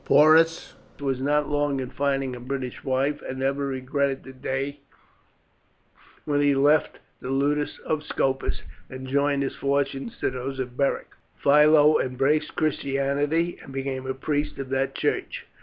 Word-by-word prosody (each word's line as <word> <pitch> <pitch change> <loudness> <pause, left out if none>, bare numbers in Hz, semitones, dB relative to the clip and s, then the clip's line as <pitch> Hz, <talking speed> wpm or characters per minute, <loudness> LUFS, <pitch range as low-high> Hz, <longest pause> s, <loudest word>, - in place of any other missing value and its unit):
Porus 160 +3 +5 0.3
was 135 -2 -2
not 145 +1 +1
long 145 -2 0
in 130 -1 -5
finding 135 -2 -1
a - - -8
British 130 0 -5
wife, 135 +2 0
and 130 - -6
never 135 +1 0
regretted 135 +1 -1
the 130 - -11
day 135 +2 -3 1.5
when 145 -1 +1
he 145 -1 +3
left 145 +3 +3 0.2
the 125 - -7
ludus 145 +2 0
of 155 -1 0
Scopus 135 -3 -1 0.3
and 130 0 -8
joined 140 +1 +1
his 135 - -3
fortunes 140 +9 -1
to - - -1
those 130 +1 -5
of 125 -2 -4
Beric. 140 +1 0 0.3
Philo 150 +1 +5
embraced 135 +4 0
Christianity, 145 +3 0
and - - -12
became 135 -1 -4
a 130 - -2
priest 145 +2 -2
of 135 -1 -5
that 135 0 -1
church. - - -2
140 Hz, 150 wpm, -25 LUFS, 135-145 Hz, 1.5 s, Porus